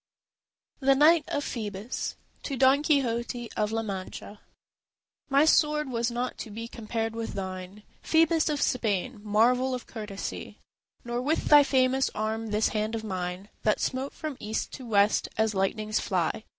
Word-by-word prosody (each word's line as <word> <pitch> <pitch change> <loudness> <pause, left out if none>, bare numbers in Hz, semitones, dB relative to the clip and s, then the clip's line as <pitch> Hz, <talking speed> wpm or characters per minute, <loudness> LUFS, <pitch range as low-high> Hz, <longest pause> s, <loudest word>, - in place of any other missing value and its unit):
THE 275 -1 +4
KNIGHT 305 +2 +5
OF 290 - -2
PHŒBUS 210 0 -4 0.3
To 275 - -4
Don 265 +3 +5
Quixote 240 -5 0
of 210 0 0
La 225 0 -1
Mancha 200 0 -6 0.9
My 280 +2 +5
sword 300 -3 +3
was 235 0 0
not 245 +1 -3
to 225 - -6
be 225 +2 -6
compared 225 -1 -3
with 225 0 -4
thine 190 +1 -6 0.2
Phœbus 325 0 +3
of 295 -1 -1
Spain, 220 -1 -1
marvel 245 +5 +3
of 250 - -7
courtesy, 210 -4 -6 0.5
Nor 240 +1 -2
with 300 +5 0
thy 295 -1 +8
famous 265 -1 +2
arm 220 +1 -2
this 210 +1 +2
hand 215 +1 -1
of 220 - -4
mine 185 -1 -4
That 215 - +2
smote 265 +2 -2
from 305 -4 -6
east 215 +1 -3
to 255 -3 -8
west 205 -1 +3
as 220 0 +2
lightnings 210 +2 0
fly. 185 +3 -1
230 Hz, 155 wpm, -27 LUFS, 210-265 Hz, 0.9 s, thy